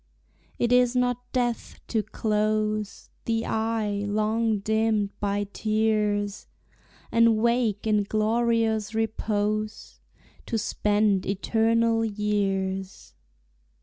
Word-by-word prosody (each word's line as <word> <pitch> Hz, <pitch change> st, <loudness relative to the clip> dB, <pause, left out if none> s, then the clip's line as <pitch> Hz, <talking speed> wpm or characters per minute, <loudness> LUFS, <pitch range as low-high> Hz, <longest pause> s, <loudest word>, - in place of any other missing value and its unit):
It 240 Hz, -, 0 dB
is 250 Hz, 0 st, +4 dB
not 245 Hz, 0 st, -1 dB
death 245 Hz, -2 st, -2 dB
to 225 Hz, -, +1 dB
close 215 Hz, 0 st, -1 dB
The 225 Hz, 0 st, 0 dB
eye 220 Hz, -2 st, -1 dB
long 215 Hz, +1 st, +1 dB
dimmed 215 Hz, 0 st, 0 dB
by 205 Hz, 0 st, 0 dB
tears, 210 Hz, -2 st, 0 dB, 0.6 s
And 230 Hz, -1 st, +4 dB
wake 235 Hz, -2 st, +1 dB
in 210 Hz, -2 st, +2 dB
glorious 220 Hz, 0 st, +1 dB
repose, 215 Hz, -1 st, -2 dB, 0.5 s
To 230 Hz, -, -1 dB
spend 205 Hz, -2 st, +1 dB
eternal 225 Hz, +3 st, +1 dB
years. 195 Hz, -3 st, -2 dB
215 Hz, 90 wpm, -26 LUFS, 205-225 Hz, 0.6 s, is